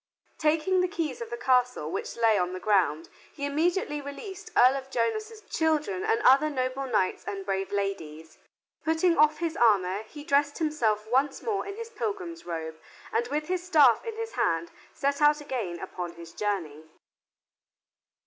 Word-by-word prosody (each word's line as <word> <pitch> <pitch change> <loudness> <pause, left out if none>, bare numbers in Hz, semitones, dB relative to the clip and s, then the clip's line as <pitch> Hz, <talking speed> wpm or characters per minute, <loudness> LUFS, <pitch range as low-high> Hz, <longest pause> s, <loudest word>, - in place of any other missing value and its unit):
Taking 320 +4 +2
the 365 - +2
keys 355 +4 -3
of 465 - -5
the 460 - -4
castle, 250 - +1
which - - -4
lay 225 -2 +4
on 180 -2 0
the 185 - -5
ground, 180 -7 +1 0.2
he 285 - -5
immediately 300 +1 0
released 320 +8 -8
Earl 255 +2 +7
of 265 0 -8
Jonas's 430 - -2
children 305 - 0
and 230 - +2
other 275 +4 +6
noble 260 -1 -2
knights 210 -6 0
and 195 -1 -4
brave 195 -1 -2
ladies. 165 -6 -4 0.4
Putting 325 +2 +2
off 305 0 +4
his 330 -1 -2
armor, 200 - +3
he 290 +7 -11
dressed 285 0 +2
himself 235 -10 0
once 265 +5 +1
more 415 -3 -1
in 400 - -5
his 460 +1 -7
pilgrim's 395 -7 -4
robe, 160 -2 -5 0.3
and 460 +1 +1
with 300 +1 -2
his 365 -1 -1
staff 300 -9 +5
in 455 -2 -5
his 455 0 -4
hand 165 - 0 0.2
set 280 +1 -1
out 295 0 +5
again 235 -12 -4
upon 180 -1 -6
his 170 -1 -12
journey. 165 -8 -3
275 Hz, 170 wpm, -27 LUFS, 200-330 Hz, 0.4 s, Earl